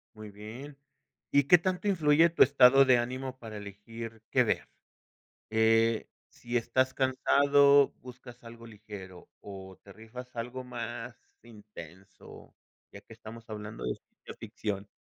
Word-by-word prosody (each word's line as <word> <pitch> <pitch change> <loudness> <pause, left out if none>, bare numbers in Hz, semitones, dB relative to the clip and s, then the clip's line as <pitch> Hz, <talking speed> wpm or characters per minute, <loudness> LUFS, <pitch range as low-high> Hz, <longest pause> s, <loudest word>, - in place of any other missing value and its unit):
Muy 110 -1 -10
bien, 115 +8 -10 0.5
¿y 140 0 +4
qué 175 +6 +6
tanto 185 +3 -3
influye 165 -3 +4
tu 165 - +4
estado 135 0 +6
de 130 -2 +4
ánimo 130 +2 -4
para 110 -3 -9
elegir 110 +3 -9
qué - - +4
ver?, - - -2 0.8
eh, 115 0 +2 0.2
si 120 +1 -5
estás 130 +3 0
cansado, 140 +1 +4
¿buscas 125 -1 -13
algo 115 0 -12
ligero 100 -5 -12
o 95 -2 -11
te 100 - -14
rifas 115 +4 -11
algo 125 +2 -5
más 120 0 -7 0.3
intenso?, 100 -5 -14 0.4
ya - - -11
que - - -17
estamos 115 +1 -11
hablando 105 - -7
de 60 - -1
ciencia - - -15
ficción. 100 -1 -5
115 Hz, 135 wpm, -29 LUFS, 105-130 Hz, 0.8 s, qué